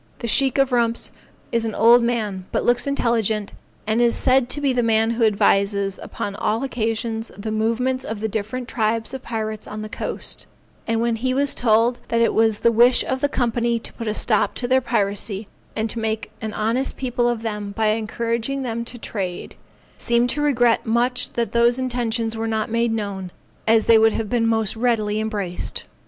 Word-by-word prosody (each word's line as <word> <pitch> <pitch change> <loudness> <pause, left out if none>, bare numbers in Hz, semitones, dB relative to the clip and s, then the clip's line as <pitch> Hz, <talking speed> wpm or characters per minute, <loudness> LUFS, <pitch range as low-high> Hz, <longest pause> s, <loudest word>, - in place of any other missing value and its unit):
The 235 - -5
Sheikh 265 +3 +2
of 275 -1 +3
Rumps 235 -1 0 0.4
is 230 -1 +1
an 225 -2 -3
old 235 +2 +6
man, 215 -6 -1
but - - 0
looks 240 +2 +2
intelligent, 225 -6 0 0.3
and 220 +2 +1
is 235 -1 +4
said 255 -1 +3
to 290 - -2
be 280 -2 +1
the 245 - +2
man 225 -1 +2
who 230 0 0
advises 200 -1 +2
upon 200 -1 -5
all 220 +4 -1
occasions 225 -2 -2
the 215 +2 -4
movements 230 +4 0
of 220 -1 -5
the 220 - -1
different 220 +4 -4
tribes 225 0 -1
of 265 - -5
pirates 220 -3 -4
on 215 0 -6
the 215 - -7
coast, - - -4 0.4
and 225 0 +1
when 235 -1 0
he 255 +3 -1
was 280 +1 +2
told 235 +1 +2
that 230 - 0
it 230 - +3
was 220 -1 +2
the 235 - +4
wish 240 +2 +5
of 260 0 -2
the 285 - +2
Company 235 -2 0
to 230 - -9
put 230 - -6
a 215 - -1
stop 215 -2 +1
to 245 - -1
their 260 +1 +3
piracy, 205 -3 -1 0.3
and 220 +1 -2
make 220 -1 -3
an 220 -1 -3
honest 230 +5 0
people 245 -2 0
of 235 -2 -2
them 210 -2 -4
by 220 +1 +1
encouraging 230 +4 -1
them 235 -2 -3
to 245 - -7
trade, 190 -6 -5 0.5
seemed 235 0 +2
to 295 - -2
regret 245 -5 +3
much 245 +2 0
that 235 -1 -1
those 235 +1 +3
intentions 235 -3 -1
were 225 0 -2
not 220 -1 -1
made 230 0 +1
known, 200 -4 -4 0.4
as 220 0 +4
they 230 -1 +6
would 225 0 +4
have 220 -2 -3
been 235 -2 +2
most 220 -2 0
readily 220 -3 0
embraced. 205 -5 -2
230 Hz, 195 wpm, -22 LUFS, 220-240 Hz, 0.5 s, old